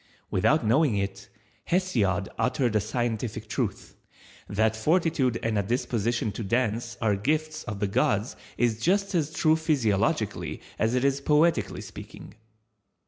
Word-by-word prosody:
Without 130 Hz, -, +2 dB
knowing 120 Hz, 0 st, +3 dB
it, 100 Hz, -1 st, -4 dB, 0.4 s
Hesiod 110 Hz, -, +1 dB
uttered 125 Hz, -3 st, +1 dB
a 105 Hz, -, +3 dB
scientific 110 Hz, -1 st, -3 dB
truth. -, -, -3 dB, 0.5 s
That 110 Hz, +2 st, +1 dB
Fortitude 150 Hz, -1 st, +1 dB
and 110 Hz, -2 st, +1 dB
a -, -, +3 dB
Disposition 115 Hz, 0 st, -1 dB
to 115 Hz, -, -5 dB
Dance 120 Hz, +2 st, -1 dB
are 110 Hz, -3 st, +2 dB
gifts 155 Hz, +9 st, -1 dB
of 100 Hz, -1 st, -5 dB
the 105 Hz, -, 0 dB
gods 105 Hz, +3 st, +1 dB, 0.2 s
is 115 Hz, -2 st, +1 dB
just 195 Hz, -, +1 dB
as 155 Hz, -4 st, 0 dB
true 160 Hz, 0 st, +3 dB
physiologically 110 Hz, -, 0 dB, 0.2 s
as 110 Hz, +3 st, +1 dB
it 125 Hz, +1 st, +1 dB
is 140 Hz, 0 st, +1 dB
poetically 155 Hz, +4 st, +2 dB
speaking. -, -, -10 dB
120 Hz, 140 wpm, -27 LUFS, 105-150 Hz, 0.5 s, knowing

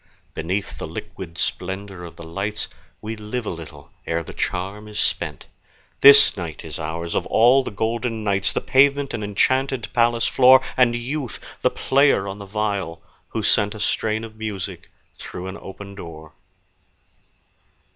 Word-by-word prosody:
Beneath 95 Hz, +5 st, -3 dB
the -, -, -4 dB
liquid 85 Hz, -3 st, -8 dB
splendor 95 Hz, 0 st, -4 dB
of 85 Hz, -, -11 dB
the -, -, -10 dB
lights 100 Hz, +6 st, -3 dB, 0.3 s
We 110 Hz, +1 st, -4 dB
live 110 Hz, +3 st, -4 dB
a -, -, -2 dB
little 75 Hz, -4 st, -10 dB, 0.2 s
ere 85 Hz, 0 st, 0 dB
the -, -, -9 dB
charm 100 Hz, +4 st, -3 dB
is 105 Hz, -1 st, -6 dB
spent; -, -, -2 dB, 0.5 s
This 140 Hz, +1 st, +9 dB
night 85 Hz, -6 st, -6 dB
is -, -, -6 dB
ours, 85 Hz, +2 st, -4 dB
of -, -, -1 dB
all 125 Hz, +4 st, +5 dB
the -, -, -4 dB
golden 115 Hz, +1 st, -2 dB
nights, 100 Hz, -2 st, +2 dB
The -, -, -1 dB
pavement 140 Hz, +1 st, +3 dB
an 110 Hz, -, -3 dB
enchanted 130 Hz, +4 st, +1 dB
palace 120 Hz, -1 st, +3 dB
floor, 130 Hz, 0 st, +7 dB, 0.2 s
And 120 Hz, -2 st, +4 dB
Youth 125 Hz, +2 st, -4 dB, 0.2 s
the -, -, +4 dB
player 135 Hz, -7 st, +3 dB
on 100 Hz, +1 st, -6 dB
the 100 Hz, -, -7 dB
viol, 100 Hz, -4 st, -2 dB, 0.2 s
who -, -, -3 dB
sent 105 Hz, +1 st, +2 dB
A -, -, -8 dB
strain 110 Hz, +1 st, 0 dB
of 110 Hz, -1 st, -9 dB
music 110 Hz, -4 st, -5 dB, 0.3 s
through 90 Hz, -, -7 dB
an 95 Hz, +1 st, -6 dB
open 100 Hz, +1 st, -9 dB
door. 80 Hz, -4 st, -10 dB
105 Hz, 160 wpm, -22 LUFS, 95-120 Hz, 0.5 s, This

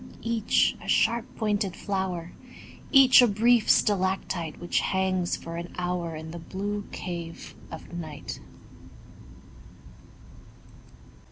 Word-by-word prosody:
Each 230 Hz, -1 st, +2 dB
a -, -, -10 dB
sharp 235 Hz, +1 st, +2 dB
pointed 205 Hz, -4 st, -1 dB
flower, 185 Hz, -4 st, -3 dB, 0.6 s
Each 270 Hz, -2 st, +8 dB
a 245 Hz, -, +6 dB
brief 225 Hz, +2 st, +3 dB
stalactite 185 Hz, -4 st, +1 dB
Which 175 Hz, -, 0 dB
hangs 185 Hz, -2 st, 0 dB
for 165 Hz, 0 st, -7 dB
an 170 Hz, +1 st, -6 dB
hour 180 Hz, -2 st, -2 dB
In 160 Hz, +1 st, -7 dB
the 170 Hz, -, -7 dB
blue 205 Hz, +4 st, -4 dB
cave 170 Hz, -2 st, -6 dB, 0.2 s
of -, -, -10 dB
night. 160 Hz, -4 st, -6 dB
190 Hz, 105 wpm, -27 LUFS, 170-210 Hz, 0.6 s, Each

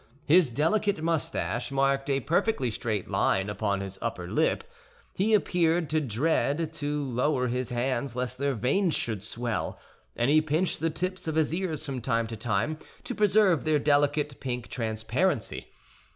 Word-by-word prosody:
His 165 Hz, -1 st, +5 dB
delicate 195 Hz, -, +1 dB
mustache 160 Hz, -6 st, -1 dB
marked 135 Hz, +1 st, +1 dB
a 135 Hz, 0 st, +2 dB
perfectly 165 Hz, -, +1 dB
straight 105 Hz, -2 st, -2 dB
line 95 Hz, +2 st, +1 dB
upon 100 Hz, -2 st, -1 dB
his 95 Hz, 0 st, -6 dB
upper -, -, -3 dB
lip; -, -, +1 dB, 0.5 s
he 215 Hz, +3 st, +3 dB
appeared 170 Hz, -5 st, +1 dB
to 155 Hz, 0 st, +2 dB
dread 150 Hz, +5 st, 0 dB
to 150 Hz, -2 st, -2 dB
lower 125 Hz, +1 st, 0 dB
his 125 Hz, +1 st, -2 dB
hands 125 Hz, +1 st, -1 dB
lest 125 Hz, 0 st, -2 dB
their 140 Hz, -1 st, 0 dB
veins 150 Hz, -, +1 dB
should 110 Hz, -4 st, -2 dB
swell, 115 Hz, +1 st, -3 dB, 0.4 s
and 120 Hz, +4 st, +2 dB
he 155 Hz, +1 st, +6 dB
pinched 155 Hz, +4 st, 0 dB
the 165 Hz, -, +1 dB
tips 185 Hz, +3 st, -4 dB
of 160 Hz, -, -1 dB
his 160 Hz, -1 st, +2 dB
ears 170 Hz, -4 st, -2 dB
from 135 Hz, -4 st, -4 dB
time 115 Hz, -1 st, 0 dB
to 115 Hz, 0 st, -6 dB
time 115 Hz, +7 st, -1 dB, 0.2 s
to -, -, -4 dB
preserve 200 Hz, -, +3 dB
their 155 Hz, -1 st, +3 dB
delicate 145 Hz, 0 st, +1 dB
pink 125 Hz, -3 st, -4 dB
transparency. 115 Hz, -, -1 dB
140 Hz, 160 wpm, -28 LUFS, 120-160 Hz, 0.5 s, he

